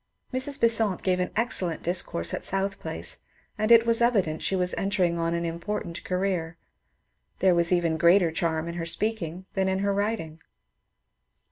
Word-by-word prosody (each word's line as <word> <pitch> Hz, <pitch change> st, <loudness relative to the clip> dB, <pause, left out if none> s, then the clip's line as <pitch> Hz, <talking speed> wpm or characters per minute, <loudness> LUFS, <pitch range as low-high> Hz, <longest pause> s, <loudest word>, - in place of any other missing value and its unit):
Mrs. 275 Hz, +3 st, 0 dB
Besant 225 Hz, -5 st, +2 dB
gave 185 Hz, -1 st, +1 dB
an 180 Hz, -, -1 dB
excellent 195 Hz, -8 st, 0 dB
discourse 170 Hz, -, -1 dB
at -, -, -3 dB
South 195 Hz, +1 st, -1 dB
Place, -, -, -3 dB, 0.4 s
and 215 Hz, +2 st, 0 dB
it 230 Hz, 0 st, +8 dB
was 230 Hz, 0 st, +2 dB
evident 200 Hz, -10 st, +2 dB
that -, -, -9 dB
she 195 Hz, -, 0 dB
was 180 Hz, -1 st, +1 dB
entering 185 Hz, -4 st, 0 dB
on 165 Hz, 0 st, 0 dB
an 170 Hz, -, -2 dB
impor 170 Hz, +5 st, -3 dB
tant 170 Hz, +1 st, -8 dB
career. 180 Hz, -3 st, -2 dB, 0.8 s
There 190 Hz, -1 st, +4 dB
was 170 Hz, 0 st, +2 dB
even 170 Hz, -3 st, +2 dB
greater 170 Hz, +1 st, +5 dB
charm 160 Hz, 0 st, -1 dB
in 170 Hz, -, -4 dB
her -, -, -3 dB
speaking 185 Hz, -2 st, -3 dB
than 190 Hz, -1 st, 0 dB
in 190 Hz, 0 st, +1 dB
her 200 Hz, -, +1 dB
writing. 200 Hz, -6 st, -2 dB
185 Hz, 175 wpm, -26 LUFS, 170-210 Hz, 0.8 s, it